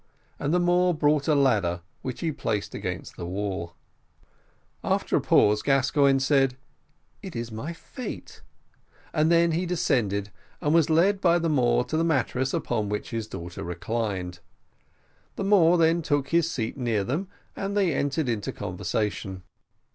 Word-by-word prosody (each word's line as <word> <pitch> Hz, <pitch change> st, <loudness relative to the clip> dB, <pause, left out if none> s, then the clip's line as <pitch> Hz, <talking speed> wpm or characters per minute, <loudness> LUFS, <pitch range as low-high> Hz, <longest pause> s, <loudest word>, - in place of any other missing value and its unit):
and 145 Hz, -, -1 dB
the 180 Hz, -, +3 dB
Moor 175 Hz, 0 st, +3 dB
brought 150 Hz, -1 st, +2 dB
a 155 Hz, -, +4 dB
ladder, 100 Hz, -11 st, +2 dB, 0.2 s
which 130 Hz, -2 st, -5 dB
he 165 Hz, -, 0 dB
placed 110 Hz, -7 st, -3 dB
against -, -, -5 dB
the 85 Hz, -, -5 dB
wall. 95 Hz, -3 st, -4 dB, 1.1 s
After -, -, 0 dB
a -, -, +3 dB
pause, 105 Hz, 0 st, +4 dB
Gascoigne 135 Hz, 0 st, +3 dB
said, 135 Hz, -1 st, +2 dB, 0.6 s
"It -, -, -8 dB
is 115 Hz, 0 st, -4 dB
my 110 Hz, +10 st, -5 dB
fate;" 235 Hz, +9 st, -8 dB, 0.7 s
and 155 Hz, +1 st, +2 dB
he 170 Hz, -, +6 dB
then 170 Hz, +2 st, -1 dB
descended, 105 Hz, -, 0 dB, 0.3 s
and 150 Hz, -, +1 dB
was 165 Hz, -2 st, +4 dB
led 190 Hz, +5 st, +3 dB
by 170 Hz, -1 st, +4 dB
the 165 Hz, -1 st, 0 dB
Moor 120 Hz, -4 st, +3 dB
to 140 Hz, +6 st, -3 dB
the 165 Hz, -, +2 dB
mattress 130 Hz, -4 st, 0 dB
upon 110 Hz, -4 st, -1 dB
which 105 Hz, 0 st, -4 dB
his 115 Hz, -2 st, -3 dB
daughter 85 Hz, -4 st, -7 dB
reclined. 90 Hz, 0 st, -3 dB, 1.0 s
The -, -, -3 dB
Moor 180 Hz, -4 st, +5 dB
then 165 Hz, +1 st, +3 dB
took 145 Hz, -3 st, 0 dB
his 165 Hz, -1 st, +2 dB
seat 115 Hz, -8 st, -3 dB
near 115 Hz, -6 st, 0 dB
them, 155 Hz, -, -2 dB, 0.3 s
and 200 Hz, +1 st, -3 dB
they 190 Hz, -6 st, +2 dB
entered 140 Hz, +2 st, -1 dB
into 115 Hz, -4 st, -2 dB
conversation. 100 Hz, -3 st, -3 dB
135 Hz, 155 wpm, -26 LUFS, 110-165 Hz, 1.1 s, he